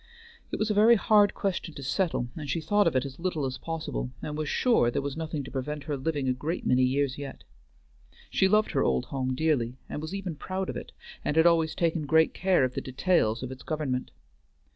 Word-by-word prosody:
It - - -2
was 215 0 0
a - - +2
very 220 +3 +6
hard 205 -1 +4
question 185 -5 -2
to 140 - -7
settle, 135 -3 0
and 150 -3 -6
she 165 - 0
thought 205 +5 +2
of 165 - +1
it 130 - +2
as 135 +2 -8
little 165 -5 -1
as 130 0 -4
possible, 155 - -4
and 150 - -4
was 155 -1 -2
sure 235 - +3
there - - -1
was 140 0 -3
nothing 155 -2 -3
to 130 - -9
prevent 145 +2 -4
her 145 +1 -2
living 140 0 -2
a 130 - +3
great 150 +7 -4
many 125 0 +3
years 135 +1 +1
yet. 140 -2 -7 0.9
She 190 - +3
loved 215 +2 +3
her - - +1
old 65 -2 +1
home 130 -1 -2
dearly, 130 -5 0
and 150 - -5
was 155 +5 -5
even 190 -5 -4
proud 185 +4 -3
of - - -10
it, - - -7 0.3
and 150 - -1
had 160 - +6
always 165 -2 +3
taken 165 -3 0
great 160 +1 +4
care 190 -6 +2
of 130 -1 0
the - - -3
details 130 -4 +1
of 130 - -5
its 130 - -9
government. 145 -5 -2
150 Hz, 230 wpm, -28 LUFS, 130-170 Hz, 0.9 s, very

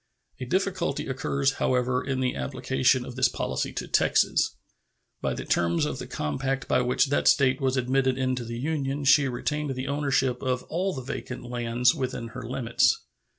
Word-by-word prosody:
A 130 - -4
difficulty 185 0 -1
occurs, 135 +1 0
however, 125 0 +1
in 130 -1 -2
the 125 -1 0
application 130 -1 +1
of 125 - -8
this 130 -1 +3
policy - - -2
to - - -4
Texas. - - +2 0.7
By - - -1
the - - -6
terms 85 0 +1
of - - -3
the - - -6
compact 135 - -2
by - - +3
which 125 +3 +2
that 145 - +2
State 135 0 +4
was 135 0 +1
admitted 130 +1 +1
into 130 -1 -1
the 115 0 -6
Union 140 0 -2
she 140 +1 +6
retained 145 +3 -2
the 130 +1 -4
ownership 135 -3 0
of 130 -1 -1
all 185 +3 -1
the 130 - -5
vacant 130 -1 -6
lands 120 0 +1
within 125 -3 -4
her 125 +3 -8
limits. 120 0 +1
130 Hz, 175 wpm, -26 LUFS, 125-135 Hz, 0.7 s, she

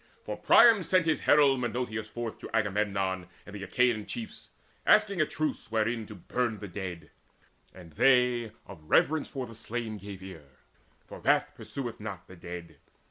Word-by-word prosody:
For - - -4
Priam 230 -4 +6
sent 185 -1 +2
his 160 -1 +2
herald 140 -3 +5
Menoetes 115 -2 -3
forth 120 -1 -5
To - - -8
Agamemnon 100 -3 0 0.2
and 100 - -11
the 100 - -7
Achaean 115 +1 +1
chiefs, 230 -2 -7 0.3
Asking 200 -5 +4
a 155 - +2
truce 155 -6 -3
wherein 110 0 -1
to 105 - -9
burn 115 +5 -2
the 105 - -7
dead; 90 -2 -7 0.6
And 90 -3 -13
they, 125 - +3
of 80 - -12
reverence 155 0 +3
for 135 -3 -5
the 115 - -11
slain, 115 -1 -5
gave 100 -1 -9
ear; 75 -9 -12 0.5
For - - -10
wrath - - +2
pursueth 125 -4 -6
not 100 -5 -7
the 95 - -13
dead. 85 -3 -9
110 Hz, 165 wpm, -29 LUFS, 95-125 Hz, 0.6 s, Priam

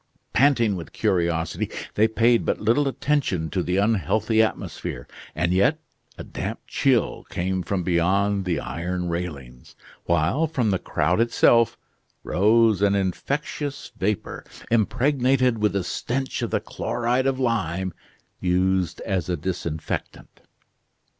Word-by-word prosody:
Panting 120 -6 +3
with 85 -3 -8
curiosity, 85 -2 0 0.2
they 110 +2 +4
paid 115 +1 +3
but - - -1
little 120 +7 +2
attention 135 - -1
to 95 - 0
the 90 +1 -1
unhealthy 110 +2 +2
atmosphere: 65 - -3 0.3
and 85 +4 +1
yet 100 +12 +3 0.4
a - - -6
damp - - -5
chill 130 -6 +1
came 95 +1 -1
from 90 +1 -2
beyond 95 +3 +1
the 90 -2 0
iron 90 +1 -3
railings, 70 -8 -6 0.3
while 85 - +2
from 125 -9 0
the 95 - 0
crowd 80 +6 0
itself 115 -1 +4 0.5
rose 110 +1 +3
an 100 -1 +3
infectious 140 - -3
vapor, 105 -2 -2 0.3
impregnated 125 +1 +2
with 105 -1 +1
the 100 -2 0
stench 130 +8 -3
of - - -1
the - - +1
chloride 120 +2 -1
of 135 -1 0
lime 95 -7 -1 0.5
used 90 -1 +1
as 95 -3 -2
a 90 - 0
disinfectant. 80 -1 -5
100 Hz, 125 wpm, -24 LUFS, 90-120 Hz, 0.5 s, they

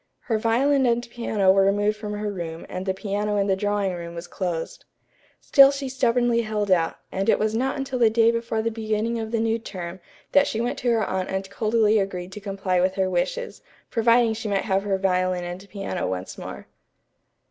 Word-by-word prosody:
Her 225 -3 -1
violin 260 +4 +2
and 240 0 +1
piano 215 -5 +2
were 195 +1 +4
removed 205 +2 +2
from 210 -1 -6
her 210 0 -3
room 165 -3 -6
and 185 +1 -6
the 190 - +1
piano 205 +1 -2
in 200 - +2
the 195 -1 +2
drawing 205 -1 0
room 170 -1 -7
was 170 +1 -6
closed. 175 -3 -4 0.6
Still 275 -2 +7
she 275 -1 -3
stubbornly 240 -2 +2
held 210 -3 -2
out, 165 -3 +2 0.2
and 195 +3 -1
it - - +5
was 215 0 0
not 260 +5 0
until 270 -2 -3
the 230 -2 +5
day 225 +1 +4
before 230 -1 -2
the 230 - 0
beginning 220 +1 -1
of 220 -1 -4
the 230 0 -1
new 225 0 +1
term 185 -4 -7 0.3
that 285 0 +5
she 220 - -2
went 240 +1 -2
to 245 - 0
her 230 -2 +2
aunt 185 -1 -2
and 190 0 -3
coldly 215 0 +2
agreed 185 -2 -3
to 210 - -7
comply 195 -3 -1
with 185 +1 +1
her 190 -1 0
wishes, 480 - -2 0.3
providing 230 0 +4
she 220 0 -5
might 195 -1 0
have 195 -2 +1
her 195 -1 0
violin 185 -1 0
and 180 +3 -7
piano 195 -3 -3
once 95 0 -4
more. - - -8
210 Hz, 210 wpm, -24 LUFS, 190-230 Hz, 0.6 s, Still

